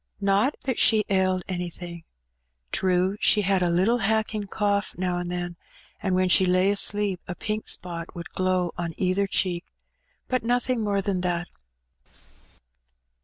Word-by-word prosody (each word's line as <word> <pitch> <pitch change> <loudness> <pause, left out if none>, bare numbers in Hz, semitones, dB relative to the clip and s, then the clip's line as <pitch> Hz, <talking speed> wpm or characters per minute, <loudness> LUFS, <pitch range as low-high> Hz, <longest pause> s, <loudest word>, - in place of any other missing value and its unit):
Not 200 +7 +2
that 260 -3 -1
she 215 -2 +5
ailed 185 -2 +2
anything. 175 -2 -6 0.7
True, 185 +1 +1
she 210 - +4
had 195 -1 +2
a 175 - +2
little 190 +8 +2
hacking 220 0 0
cough 205 -1 0
now 180 -1 -1
and 175 0 -4
then, 175 -1 -4 0.4
and 190 -2 0
when 185 0 +2
she 185 - +5
lay 185 +2 +3
asleep 205 -2 +1
a 180 - -4
pink 215 +3 -3
spot 170 -2 -3
would 170 -1 -7
glow 185 -2 0
on 170 -2 -3
either 190 +2 +1
cheek; 180 -2 0 0.6
but 255 -1 0
nothing 245 0 0
more 200 -1 0
than 190 -2 -1
that. 175 -1 -1
185 Hz, 150 wpm, -25 LUFS, 180-205 Hz, 0.7 s, she